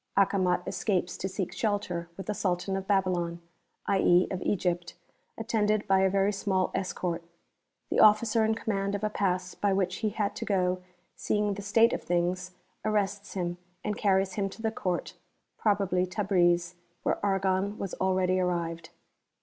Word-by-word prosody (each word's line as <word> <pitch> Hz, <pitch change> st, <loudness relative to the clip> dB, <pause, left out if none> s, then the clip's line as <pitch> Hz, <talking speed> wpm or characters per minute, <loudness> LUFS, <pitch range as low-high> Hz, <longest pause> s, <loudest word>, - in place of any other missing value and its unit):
Acomat 185 Hz, -2 st, +3 dB
escapes 180 Hz, -4 st, -1 dB
to 190 Hz, -, -3 dB
seek 190 Hz, -1 st, -3 dB
shelter 185 Hz, -6 st, -2 dB
with 195 Hz, -, -6 dB
the 210 Hz, -, -1 dB
Sultan 190 Hz, -1 st, -1 dB
of 190 Hz, 0 st, -4 dB
Babylon, 180 Hz, -4 st, +1 dB, 0.5 s
i.e., 185 Hz, -2 st, +4 dB
of 185 Hz, -1 st, -3 dB
Egypt, 175 Hz, -3 st, -1 dB, 0.4 s
attended 215 Hz, -2 st, 0 dB
by 195 Hz, -1 st, +4 dB
a 190 Hz, 0 st, +4 dB
very 195 Hz, +1 st, +2 dB
small 190 Hz, -2 st, 0 dB
escort. 175 Hz, -2 st, -2 dB, 0.7 s
The -, -, +2 dB
Officer 215 Hz, +1 st, +5 dB
in 220 Hz, 0 st, +2 dB
command 200 Hz, -3 st, -1 dB
of 205 Hz, -, -4 dB
a 215 Hz, -, 0 dB
Pass 185 Hz, -3 st, -1 dB
by 200 Hz, -1 st, 0 dB
which 190 Hz, -1 st, 0 dB
he 220 Hz, -, 0 dB
had 205 Hz, -1 st, -2 dB
to -, -, -3 dB
go, 185 Hz, -2 st, +1 dB, 0.3 s
seeing 210 Hz, -1 st, 0 dB
the 200 Hz, -, -6 dB
state 225 Hz, +3 st, +4 dB
of -, -, -2 dB
things, 180 Hz, +1 st, -1 dB, 0.3 s
arrests 205 Hz, -1 st, -1 dB
him 175 Hz, -1 st, -2 dB, 0.2 s
and 210 Hz, -1 st, -1 dB
carries 190 Hz, -2 st, +2 dB
him 195 Hz, -2 st, -1 dB
to 210 Hz, -, -11 dB
the 220 Hz, -, +1 dB
Court 180 Hz, -5 st, -2 dB, 0.5 s
(probably 195 Hz, -4 st, +1 dB
Tabriz), 175 Hz, -3 st, +2 dB, 0.3 s
where -, -, -1 dB
Argon 195 Hz, 0 st, +1 dB
was 195 Hz, -, -4 dB
already 185 Hz, -1 st, +2 dB
arrived.) 170 Hz, -2 st, -2 dB
190 Hz, 160 wpm, -29 LUFS, 180-205 Hz, 0.7 s, Officer